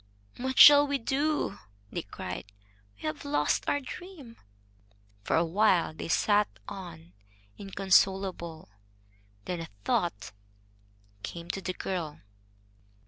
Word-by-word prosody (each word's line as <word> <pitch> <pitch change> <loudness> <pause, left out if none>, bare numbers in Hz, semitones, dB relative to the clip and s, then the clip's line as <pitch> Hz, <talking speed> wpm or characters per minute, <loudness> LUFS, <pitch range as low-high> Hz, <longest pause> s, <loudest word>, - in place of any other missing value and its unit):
"What 260 +1 -3
shall 290 0 +10
we 285 0 0
do?" 275 -3 -1 0.3
they - - -3
cried. 100 - -7 0.4
"We 100 - -23
have 155 -1 -4
lost 145 +1 0
our 285 - +1
dream." 285 -3 -10 0.9
For - - 0
a 165 - +3
while 180 -1 +2
they - - -6
sat 205 +4 +3 0.2
on, 170 -3 -9 0.5
inconsolable. 190 - +1 0.8
Then 180 -1 -3
a 165 - -6 0.2
thought 100 0 -1 0.9
came 170 - -5
to 195 - -5
the 185 - -3
girl. 170 -6 -4
190 Hz, 115 wpm, -29 LUFS, 165-245 Hz, 0.9 s, shall